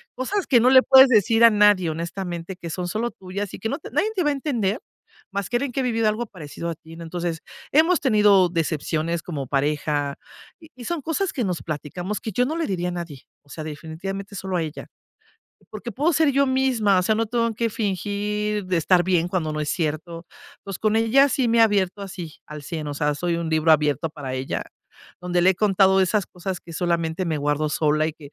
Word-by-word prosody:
cosas 370 +11 -2
que 245 -4 +5
no 250 - +5
le 260 0 +8
puedes 265 0 +8
decir 225 0 +4
a 230 - +10
nadie, 205 -5 +4
honestamente, 170 +2 -5
que 170 -2 -8
son 180 +2 -4
solo 220 +6 -2
tuyas 190 +1 -6
y - - -7
que 220 - -3
no 280 - -3
te - - -10
nadie 435 - +1
te 365 - +1
va 295 - +2
a 290 - +1
entender, 245 -7 -1 0.5
más 200 -1 -3
que 240 - +1
alguien 275 0 -3
que 270 - -3
ha - - -1
vivido 225 -3 +1
algo 225 +3 -2
parecido 170 -4 -7
a - - -2
ti, 160 +1 -14
¿no? 170 - -9
Entonces, 170 0 -4 0.3
hemos 325 +4 +4
tenido 205 -7 +4
decepciones 160 0 -1
como 145 -6 -5
pareja, 145 0 -1 0.4
y 320 -1 -16
y 245 -2 -10
son 340 -3 -2
cosas 330 +6 -1
que 255 - -1
nos 180 -5 -2
platicamos 175 +6 -5
que 220 - -4
yo 245 +6 +1
no 310 - -2
le 330 - 0
diría 180 - -2
a - - -4
nadie. 170 -6 -7 0.2
O 145 - -27
sea, 155 - -7
definitivamente 165 +7 -6
solo 190 0 -4
a - - 0
ella. 155 -2 -6 0.8
Porque 220 +2 -7
puedo 300 - +1
ser 310 -1 +3
yo 280 +1 +3
misma, 255 -7 +2
o - - +2
sea, 215 +4 +2
no 225 +1 0
tengo 230 0 0
que 230 +1 -1
fingir 210 +1 -2
de 185 -1 0
estar 175 +2 +3
bien 175 -2 +1
cuando 170 -4 -2
no 150 - -3
es 150 - -2
cierto. 165 +1 -3 0.4
Pues, 195 -2 -6
con 215 0 +1
ella 245 +5 +4
sí 255 -1 0
me 230 0 +2
he - - +6
abierto 200 -3 +2
así 180 -5 -8
al 150 -1 -8
100, 155 -1 -5
o 145 - -4
sea, 150 0 0
soy 170 +3 -1
un 170 -1 -3
libro 160 0 +2
abierto 150 +1 +2
para 135 -4 -6
ella, 130 +1 -3 0.6
donde 180 0 0
le 185 - +6
he - - +1
contado 195 -1 +3
de 190 - +5
esas 195 +1 0
cosas 180 0 -5
que 170 - -12
solamente 170 +1 -1
me 160 -2 -1
guardo 150 +1 0
sola 155 0 +1
y 160 - -3
que 145 -2 -14
185 Hz, 230 wpm, -23 LUFS, 160-225 Hz, 0.8 s, a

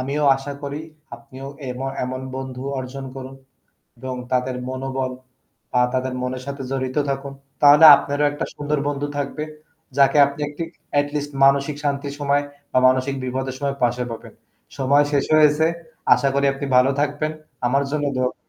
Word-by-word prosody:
আমিও 140 +3 -1
আশা 135 +1 -6
করি 140 +1 -4 0.3
আপনিও 135 -1 -11 0.2
এম 125 0 -5 0.2
এমন 130 +1 -4 0.2
বন্ধু 130 -1 -6 0.2
অর্জন 130 +1 -6
করুন 135 0 -8 0.6
এবং 130 +1 -5 0.2
তাদের 125 0 0
মনোবল 130 0 -3 0.6
বা 125 - +3
তাদের 130 0 -1
মনের 125 0 -4
সাথে 140 0 -5
জড়িত 130 0 -2
থাকুন। 135 0 -3 0.3
তাহলে 145 +2 +8
আপনারও 145 +1 -1
একটা 145 - -3
সুন্দর 150 +1 -1
বন্ধু 145 0 -2
থাকবে। 145 +2 -3 0.5
যাকে 140 +1 +5
আপনি 140 +1 -6
একটি 150 +3 -5 0.4
এটি 145 0 -1
লিস্ট 145 0 -3
মানসিক 140 +1 +4
শান্তির 140 -1 -2
সময় 145 0 +1 0.3
বা 130 - +4
মানসিক 130 +2 +1
বিপদের 130 +1 -3
সময় 140 -1 -1
পাশে 120 +1 +1
পাবেন। 115 - -9 0.4
সময় 140 +2 +4
শেষ 140 -2 +2
হয়েছে, 155 +1 +5 0.5
আশা 140 - +1
করি 140 0 +2
আপনি 140 +1 -5
ভালো 130 +2 +5
থাকবেন। 145 +1 -1 0.4
আমার 135 +3 +2
জন্য 150 -1 -1
দোয়া 130 0 +2
করবেন। - - -13
140 Hz, 160 wpm, -22 LUFS, 130-145 Hz, 0.6 s, তাহলে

